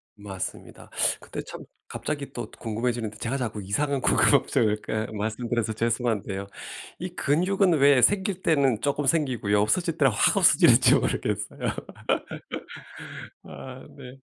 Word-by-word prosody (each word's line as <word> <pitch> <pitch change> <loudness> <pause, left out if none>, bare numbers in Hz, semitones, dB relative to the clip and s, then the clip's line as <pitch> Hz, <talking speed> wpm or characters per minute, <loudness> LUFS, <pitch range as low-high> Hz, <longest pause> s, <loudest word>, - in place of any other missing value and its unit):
맞습니다. 100 -2 -8 0.3
근데 - - -7
참 - - -9 0.2
갑자기 145 -2 -5
또 120 - -6
궁금해지는데 115 -1 -3
제가 130 +4 -2
자꾸 110 -5 -4
이상한 140 +7 -1
궁금증을 105 -2 +3
이렇게 110 0 -3
말씀드려서 110 +1 -2
죄송한데요. 115 -4 -2 0.5
이 180 +1 -4
근육은 180 +4 +1
왜 140 -2 +5
생길 190 0 +2
때는 135 -8 +2
쪼끔 145 +1 -1
생기고요. 125 -9 +1
없어질 165 - 0
때는 135 -4 +4
확 100 - +2
없어질지 - - +6
모르겠어요. - - -2 1.7
아 130 0 -10
네. 130 0 -11
125 Hz, 305 characters per minute, -25 LUFS, 110-145 Hz, 1.7 s, 없어질지